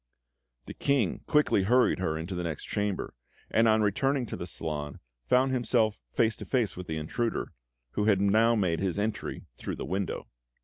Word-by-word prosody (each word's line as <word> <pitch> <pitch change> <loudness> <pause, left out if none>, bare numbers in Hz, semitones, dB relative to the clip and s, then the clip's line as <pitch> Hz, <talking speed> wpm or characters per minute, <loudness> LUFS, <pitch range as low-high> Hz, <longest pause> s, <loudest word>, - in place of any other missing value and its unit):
The - - -7
King 135 -10 +1
quickly 150 -9 +3
hurried 125 +2 +3
her 80 -4 -1
into 85 +4 -5
the 90 - -2
next 80 -4 -4
chamber, 105 -2 -2 0.4
and 115 +1 +4
on 110 0 +4
returning 135 +6 +1
to - - -5
the 85 - -6
salon, 75 -4 -4 0.3
found 130 - +4
himself 115 -4 +1
face 110 -1 +2
to - - -7
face 120 -6 0
with 90 0 -7
the 80 - -3
intruder, 115 +10 -2 0.4
who 105 - -1
had 105 -3 +4
now 110 +4 +4
made 90 -6 +1
his 95 -2 -1
entry 105 +1 -3
through - - -4
the - - -5
window. 95 +1 -3
105 Hz, 180 wpm, -29 LUFS, 90-115 Hz, 0.4 s, and